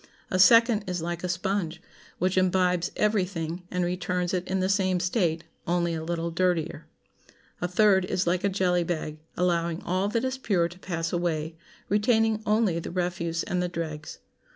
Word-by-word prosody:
A 185 Hz, -, +1 dB
second 230 Hz, +3 st, +6 dB
is 180 Hz, -2 st, -2 dB
like 175 Hz, +1 st, -4 dB
a 180 Hz, -, -2 dB
sponge, 180 Hz, -2 st, -1 dB, 0.4 s
which 185 Hz, +1 st, 0 dB
imbibes 180 Hz, -1 st, +2 dB
every 210 Hz, -2 st, +2 dB
thing, 170 Hz, -2 st, -4 dB
and 180 Hz, -1 st, -1 dB
returns 180 Hz, 0 st, -1 dB
it 185 Hz, 0 st, -1 dB
in 190 Hz, 0 st, 0 dB
the 185 Hz, -, +1 dB
same 190 Hz, -2 st, +2 dB
state, 175 Hz, -3 st, 0 dB, 0.2 s
only 170 Hz, 0 st, +1 dB
a 160 Hz, -1 st, -3 dB
little 170 Hz, 0 st, -2 dB
dirtier. 175 Hz, -2 st, -1 dB, 0.7 s
A 180 Hz, -, 0 dB
third 190 Hz, 0 st, +4 dB
is 185 Hz, 0 st, -1 dB
like 175 Hz, +1 st, +1 dB
a 200 Hz, -, +3 dB
jelly 180 Hz, -2 st, +1 dB
bag, 155 Hz, -3 st, -3 dB, 0.2 s
allowing 170 Hz, -2 st, +1 dB
all 185 Hz, +3 st, 0 dB
that 230 Hz, +4 st, 0 dB
is 260 Hz, 0 st, -2 dB
pure 185 Hz, -9 st, +1 dB
to 175 Hz, +2 st, -14 dB
pass 165 Hz, -3 st, -3 dB
away, 165 Hz, -2 st, -1 dB, 0.3 s
retaining 220 Hz, +1 st, +2 dB
only 210 Hz, -5 st, +2 dB
the -, -, -6 dB
refuse 175 Hz, -2 st, -2 dB
and 180 Hz, 0 st, -1 dB
the 180 Hz, -, -1 dB
dregs. 155 Hz, -3 st, -5 dB
180 Hz, 175 wpm, -27 LUFS, 170-190 Hz, 0.7 s, second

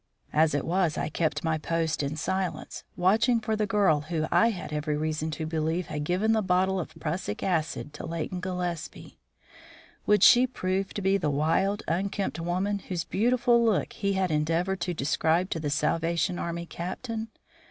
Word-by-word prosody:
As 155 Hz, -1 st, +3 dB
it 145 Hz, -, -1 dB
was, 175 Hz, -2 st, +1 dB
I -, -, -1 dB
kept 160 Hz, 0 st, -1 dB
my 160 Hz, -1 st, 0 dB
post 160 Hz, 0 st, -1 dB
in 140 Hz, +1 st, -2 dB
silence, 190 Hz, +3 st, -3 dB
watching 220 Hz, +6 st, +3 dB
for 220 Hz, 0 st, -1 dB
the 210 Hz, -1 st, 0 dB
girl 195 Hz, -7 st, +3 dB
who 155 Hz, 0 st, -2 dB
I 230 Hz, -, +5 dB
had 180 Hz, -7 st, -5 dB
every 150 Hz, 0 st, -1 dB
reason 155 Hz, +1 st, -2 dB
to 160 Hz, -, -3 dB
believe 160 Hz, +2 st, -1 dB
had 150 Hz, -1 st, -2 dB
given 185 Hz, +7 st, +1 dB
the 220 Hz, -1 st, +3 dB
bottle 190 Hz, 0 st, +2 dB
of 170 Hz, -, -6 dB
prussic 155 Hz, -, -3 dB
acid 155 Hz, -4 st, -1 dB
to 150 Hz, -, -7 dB
Leighton 170 Hz, +2 st, -3 dB
Gillespie. 180 Hz, -3 st, -5 dB, 0.9 s
Would 210 Hz, -2 st, +4 dB
she 250 Hz, +1 st, +7 dB
prove 190 Hz, -5 st, -2 dB
to 205 Hz, -, -3 dB
be 195 Hz, +1 st, +3 dB
the 165 Hz, -6 st, -1 dB
wild, 165 Hz, +8 st, +1 dB
unkempt 195 Hz, +2 st, -1 dB
woman 185 Hz, +4 st, -1 dB
whose 180 Hz, -3 st, -4 dB
beautiful 240 Hz, +2 st, +2 dB
look 220 Hz, -4 st, +1 dB
he 200 Hz, -2 st, -1 dB
had 190 Hz, -2 st, 0 dB
endeavoured 165 Hz, +5 st, 0 dB
to 175 Hz, 0 st, -2 dB
describe 160 Hz, +5 st, +1 dB
to 165 Hz, -, -1 dB
the 150 Hz, -2 st, -2 dB
Salvation 165 Hz, +4 st, 0 dB
Army 170 Hz, 0 st, -3 dB
Captain? 220 Hz, +7 st, -5 dB
175 Hz, 175 wpm, -27 LUFS, 160-195 Hz, 0.9 s, she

